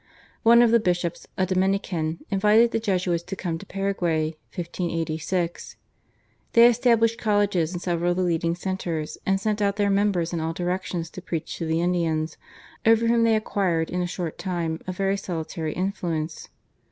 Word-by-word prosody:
One 235 +1 +7
of 235 - +4
the 235 - +6
bishops, 175 -4 -1
a 185 - +2
Dominican, 185 -4 -1
invited 210 +4 +4
the - - 0
Jesuits 185 -5 0
to 195 - -6
come 170 -4 -3
to 200 - -12
Paraguay 175 -5 -1 0.2
(1586). 170 -1 -3 0.8
They 230 0 +8
established 230 -1 +3
colleges 205 -6 +1
in 175 - -4
several 175 -1 0
of 175 - 0
the 185 - +1
leading 170 -1 0
centres, 175 -4 -4
and 195 0 +2
sent 210 +1 -1
out 200 -1 +2
their 205 -1 +1
members 195 -4 +1
in 170 - -1
all 160 +1 -2
directions 175 -1 -3
to 185 - -8
preach 165 -3 -4
to 165 - -2
the 160 +1 +1
Indians, 165 -3 0 0.5
over 225 +1 +4
whom 230 0 +3
they 225 -1 +4
acquired 185 -6 0
in 180 - -1
a 175 - -1
short 175 -2 -5
time 170 -4 -2
a - - -1
very 195 +2 0
salutary 160 -4 -4
influence. 175 -4 -3
180 Hz, 170 wpm, -25 LUFS, 165-200 Hz, 0.8 s, They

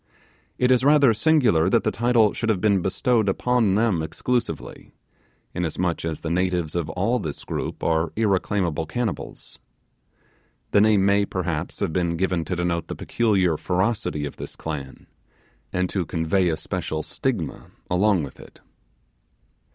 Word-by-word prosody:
It 125 0 +2
is 125 0 +4
rather 140 -4 +5
singular 110 - +3
that - - +3
the - - +1
title 115 -2 +3
should 115 - -2
have 105 -4 +2
been 100 -1 +2
bestowed 110 +3 +1
upon 115 -1 +2
them 105 -6 +2
exclusively, 80 - -3 0.6
inasmuch 85 0 -2
as 80 -2 -3
the 80 - -3
natives 90 -3 0
of 85 -3 -2
all 100 +10 0
this 80 -8 -5
group - - -4
are 80 0 +1
irreclaimable 95 -6 0
cannibals. 115 +2 -4 1.1
The 100 - +5
name 105 -2 +4
may, 100 +1 +4
perhaps, 85 -5 -3
have 80 - -1
been 85 -1 0
given 90 -2 0
to 90 - -2
denote 85 -2 -1
the - - -5
peculiar 95 -8 +1
ferocity 95 -4 -1
of 75 - -7
this - - -7
clan, 70 -4 -6 0.7
and 90 0 0
to 95 - 0
convey 90 +2 +1
a 80 - -1
special 80 +1 -3
stigma - - -3 0.2
along 95 -1 +3
with 70 - -9
it. - - -14
95 Hz, 150 wpm, -24 LUFS, 80-110 Hz, 1.1 s, rather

